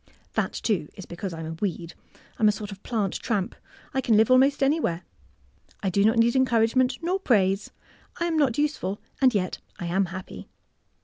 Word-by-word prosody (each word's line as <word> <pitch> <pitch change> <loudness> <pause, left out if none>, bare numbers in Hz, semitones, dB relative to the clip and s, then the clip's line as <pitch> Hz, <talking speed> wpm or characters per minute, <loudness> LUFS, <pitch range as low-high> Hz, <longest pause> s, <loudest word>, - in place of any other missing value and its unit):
^' - - -43
That, - - -1
too, 195 -9 -1
is 190 - -9
because 180 +2 -6
I'm 165 -1 -6
a 160 - -5
weed. 170 -1 -4 0.5
I'm 215 - +5
a - - +6
sort 205 0 -6
of 195 0 -10
plant 210 -6 -2
tramp. 205 -6 -1 0.4
I 265 - +1
can 230 -4 +3
live 220 +3 +4
almost 270 +2 +5
any 290 +4 +3
where. 175 - -2 0.8
I 190 - +1
do 200 +2 +2
not 220 +3 +3
need 235 +2 +4
encouragement 255 0 +3
nor 365 +3 0
praise. 195 - +2 0.5
I 340 - +1
am 335 -1 0
not 280 -7 +2
useful, 290 -10 -1 0.2
and 255 -4 +5
yet 185 -3 -1 0.2
I 175 - -5
am 190 +3 +1
happy." 185 +1 -8
215 Hz, 195 wpm, -26 LUFS, 190-255 Hz, 0.8 s, a